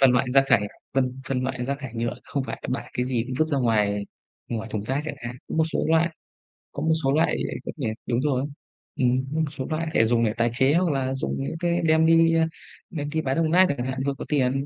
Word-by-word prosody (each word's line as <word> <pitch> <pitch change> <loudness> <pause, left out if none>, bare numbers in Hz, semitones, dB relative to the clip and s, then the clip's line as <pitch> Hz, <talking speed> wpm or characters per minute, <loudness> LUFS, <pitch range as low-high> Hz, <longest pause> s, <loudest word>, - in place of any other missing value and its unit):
phân 135 -2 +7
loại 125 +1 +2
rác 135 +1 +5
thải, 115 - +5 0.3
phân 130 -1 0
phân 130 -2 0
loại 130 -1 -2
rác 140 +2 -2
thải 135 -4 -7
nhựa 115 0 -1
không 140 - -2
phải - - -5
là - - -6
bạ - - -10
cái 125 - -1
gì 125 -3 0
cũng 130 - -4
vứt 155 - +3
ra 140 - +1
ngoài 105 -4 +1 0.4
ngoài 110 -1 -3
thùng 105 - -2
rác 130 +6 -1
chẳng 155 - -4
hạn. 120 +1 -6
Có - - -4
một 160 - +4
số - - 0
loại 165 +1 +4 0.6
có - - -4
một 160 - +2
số 135 - +2
loại, 160 +3 +3
đúng - - -3
không - - -5
nhỉ? 130 -7 -2 0.2
Đúng 120 +1 0
rồi. 135 -3 +1 0.5
Ừm, 130 +1 +2
có - - +1
một 160 - +2
số 135 -3 -5
loại 160 +1 -1
thể 115 - +4
dùng 115 +1 +2
để 110 - +1
tài 120 0 +2
chế, 130 +4 +3
hoặc 175 -1 +3
là 135 -2 0
dùng 135 - -2
những 150 - -4
cái 175 0 +1
đem 160 0 +4
đi, 165 0 +5
ơ, 165 - +4 0.4
đem 145 -3 -4
đi 160 +1 -1
bán 135 +1 -1
đồng 160 -1 +2
nát 185 +2 +7
chẳng 130 -3 -1
hạn, 130 0 -3
vừa 140 - +1
có - - -6
tiền, 135 -1 +1
135 Hz, 270 wpm, -25 LUFS, 125-155 Hz, 0.6 s, phân